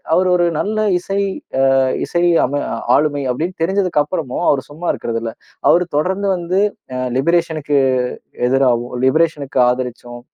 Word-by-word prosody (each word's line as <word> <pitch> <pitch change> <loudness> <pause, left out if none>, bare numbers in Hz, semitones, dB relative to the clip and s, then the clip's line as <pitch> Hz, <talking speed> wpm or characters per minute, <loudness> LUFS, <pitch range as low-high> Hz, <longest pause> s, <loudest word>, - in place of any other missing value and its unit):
அவர் 185 0 +3
ஒரு 175 -1 +2
நல்ல 215 +1 -1 0.2
இசை 195 +2 -2 0.4
அ - - +4 0.4
இசை 175 0 0 0.2
அம 145 +2 -2 0.3
ஆளுமை 145 -1 0
அப்படின்னு 165 +8 -4
தெரிஞ்சதுக்கு 180 -4 +1
அப்பறமும் 150 -4 -3
அவர் 135 -2 0
சும்மா 165 +4 -4
இருக்கிறதில்ல. 115 -1 -4 0.4
அவர் 180 +1 +4
தொடர்ந்து 190 +6 0
வந்து 180 +3 0 0.4
அ - - -2 0.2
லிபரேஷனுக்கு 155 -2 +1 0.7
எதிராவும் 125 -2 +1
லிபரேஷனுக்கு 145 -2 +1
ஆதரிச்சும் 125 -1 -4
150 Hz, 130 wpm, -18 LUFS, 130-175 Hz, 0.7 s, அ